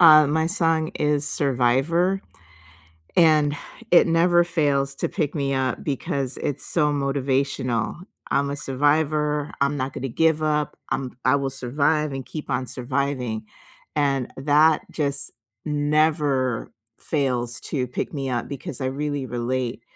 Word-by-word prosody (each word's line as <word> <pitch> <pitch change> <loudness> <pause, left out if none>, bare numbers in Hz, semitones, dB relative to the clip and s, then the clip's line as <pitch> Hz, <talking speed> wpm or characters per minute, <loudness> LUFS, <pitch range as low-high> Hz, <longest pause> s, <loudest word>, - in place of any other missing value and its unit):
Uh, 155 -3 +9
my 160 +2 +1
song 165 -3 +1
is 150 -1 +1
Survivor, 145 +8 +1 1.0
and 155 -4 +5 0.4
it 175 - +7
never 175 +1 +4
fails 145 -5 0
to - - -1
pick 155 -6 -2
me 140 -3 0
up 130 -1 -1
because 135 -2 -2
it's 145 - -3
so 150 -3 +2
motivational, 135 -4 0 0.4
"I'm 140 0 +1
a 140 - -3
survivor, 150 +2 +1
I'm 140 +1 +2
not 130 0 -2
gonna 135 - -4
give 160 +4 +2
up. 150 -1 0
I'm 135 -2 -3
I 130 +3 +4
will 135 -1 -1
survive 140 +4 0
and 135 -1 -5
keep 155 - -7
on 130 0 -1
surviving," 125 -3 -2 0.5
and 140 -4 0
that 150 +3 +4
just 140 -2 -2 0.3
never 145 -4 +1 0.3
fails 125 -5 -1
to 130 -4 -2
pick 125 - -4
me 135 -3 -3
up 120 -2 -2
because 140 0 -6
I 130 - -1
really 140 0 -2
relate 120 0 -2
140 Hz, 140 wpm, -24 LUFS, 130-155 Hz, 1.0 s, Uh